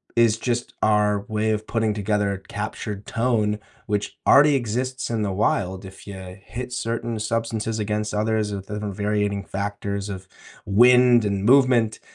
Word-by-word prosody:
is 115 -2 +4
just 120 0 -2
our 105 -1 +3
way 110 0 0
of 110 0 -2
putting 115 -2 0
together 105 -1 0
a 95 - -4
captured 100 +1 -5
tone, 110 -3 +1 0.3
which 105 0 -2
already 145 +1 +7
exists 130 +1 -2
in 110 -2 -1
the 100 - -1
wild 95 -1 0
if 95 0 -12
you 95 -1 -9
hit 125 +3 -6
certain 115 -1 -3
substances 110 0 -2
against 105 0 -2
others 105 -1 0
with 95 -1 -6
the 105 - -4
variating 105 0 -1
factors 100 0 -4
of 95 -1 -7 0.4
wind 120 +2 +6
and 100 -1 -1
movement. 125 -4 +4
105 Hz, 155 wpm, -23 LUFS, 100-115 Hz, 0.4 s, already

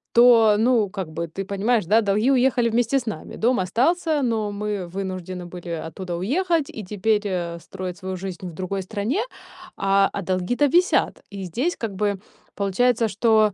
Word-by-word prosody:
То, 230 -3 +7
ну, 225 -4 +3
как 190 -4 -5
бы 165 +2 -4
ты 195 +5 -5
понимаешь, 205 +1 +1
да, 220 +5 +4
долги 210 +6 +2
уехали 250 -2 +3
вместе 240 +4 +2
с 240 - -10
нами, 215 - -5
дом 245 +1 +2
остался, 295 - +1
но 220 -4 0
мы 205 -3 -3
вынуждены 185 -1 -5
были 175 0 -9 0.2
оттуда 175 +1 -5
уехать 320 - 0
и 215 - -7
теперь, 210 +2 0
э, 170 -3 -3
строить 180 +1 -7
свою 185 0 -5
жизнь 185 -1 -6
в 170 - -8
другой 190 +3 -3
стране, 220 - -1 0.6
а 195 0 +3
а - - -3
долги-то 190 +10 +1
висят. 355 +6 +2
И 195 -1 -6
здесь 260 - -1
как 225 -3 -3
бы 200 -1 0 0.4
получается, 225 +4 +2
что, 215 -1 +3
205 Hz, 175 wpm, -23 LUFS, 185-240 Hz, 0.6 s, То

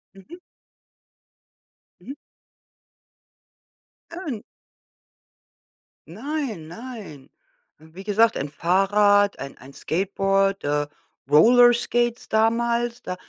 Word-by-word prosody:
Mhm. 250 - -14 1.6
Mhm. 270 - -8 2.0
Äh, 335 - -9
n 215 - -6 1.7
Nein 225 - -5
nein. 200 - -10 0.5
Wie 160 +4 -13
gesagt, 220 +3 +2
ein 140 +1 -4
Fahrrad, 200 +5 +2
ein 135 +1 -8
ein 135 +2 -14
Skateboard, 195 +3 0
äh, 145 0 -1 0.4
Roller 240 - +6
Skates 240 0 -1
damals, 235 +2 0
da 180 - -5
205 Hz, 80 wpm, -23 LUFS, 170-235 Hz, 2.0 s, Roller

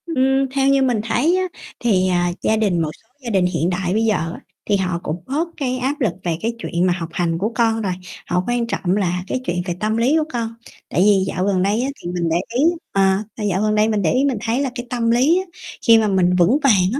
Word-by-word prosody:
Ưm, 270 -4 +1
theo 270 0 +1
như 275 0 +4
mình 245 -5 +1
thấy 245 +11 +2
á 370 - +1 0.4
thì, 190 -6 +2
à, 175 -1 +1
gia 220 - +2
đình 195 -6 +1
một 155 - -1
số - - -36 0.2
gia 240 - -4
đình 190 -4 +2
hiện 175 -1 0
đại 180 0 -1
bây 220 +2 +1
giờ 215 -2 +2 0.2
á - - -9 0.3
thì 205 - +2
họ 180 -3 -1
cũng 165 +3 -4
bớt 305 +6 -1
cái 255 -3 -1
áp 270 +4 -2
lực 220 -8 +1
về 170 -2 -1
cái 230 +2 -1
chuyện 175 -5 -1
mà 180 - +3
học 170 -2 -5
hành 165 -2 0
của 210 +6 -1
con 225 -1 +2
rồi, 190 -4 -1 0.3
họ 180 +1 0
quan 240 -1 0
trọng 190 -5 -1
là 180 -2 -1
cái 255 - -2
chuyện 175 +1 -1
về 175 - -2
tâm 215 +1 0
lý 250 +6 +3
của 315 - +2
con. 230 -1 -3 0.3
Tại - - +1
vì 200 -1 +4
dạo 185 0 -1
gần 195 -2 +1
đây 205 +4 +1
á, 265 - -1
thì 175 - -5
mình 175 -2 -1
để 165 - +1 0.2
ý 270 - +3 0.3
ờ, 195 - +1 0.4
là 220 - -4
dạo 190 +1 0
gần 215 0 +1
đây 215 +1 +3
mình 215 -2 0
để 165 - +2
ý 265 +2 +2
mình 270 -5 0
thấy 235 +2 0
là 275 - 0
cái 240 -1 -5
tâm 230 -2 0
lý 265 +9 +4
á - - -3 0.4
khi 230 -1 +8
mà 220 -1 +2
mình 185 -2 +2
vững 180 +9 +4
vàng 195 -8 +4
á 275 - -1
215 Hz, 270 wpm, -20 LUFS, 180-245 Hz, 0.4 s, khi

